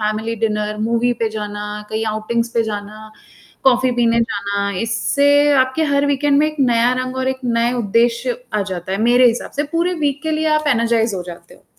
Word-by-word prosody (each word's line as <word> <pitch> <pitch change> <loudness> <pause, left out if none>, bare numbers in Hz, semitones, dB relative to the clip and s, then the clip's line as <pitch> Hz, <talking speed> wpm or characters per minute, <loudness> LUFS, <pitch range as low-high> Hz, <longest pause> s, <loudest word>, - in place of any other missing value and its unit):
Family 215 +2 -2
dinner, 210 -1 -1
movie 235 +2 +1
पे 225 - +2
जाना, 210 -1 -5 0.3
कहीं 220 +1 -2
आउटिंग्स 225 +2 -1
पे 230 - +3
जाना, 215 0 -7 0.6
कॉफी 255 -1 +4
पीने 235 -1 +3
जाना, 200 -2 -2
इससे 285 +6 +2
आपके 260 +5 -2
हर 280 0 +2
वीकेंड 285 0 +2
में 305 - +3
एक 310 0 -7
नया 235 +1 +3
रंग 255 0 -6
और 260 0 -1
एक 265 0 -3
नए 235 +1 +1
उद्देश्य 235 +2 0 0.2
आ 210 - +1
जाता 180 +1 -5
है, - - -1
मेरे 245 +2 +5
हिसाब 235 0 -2
से 290 - +1
पूरे 350 +2 +1
वीक 285 0 -1
के 315 - -1
लिए 315 0 0
आप 305 - -4
एनर्जाइज 230 -1 +1
हो 180 - -4
जाते 175 - -11
हो। - - -26
235 Hz, 200 wpm, -18 LUFS, 215-260 Hz, 0.6 s, मेरे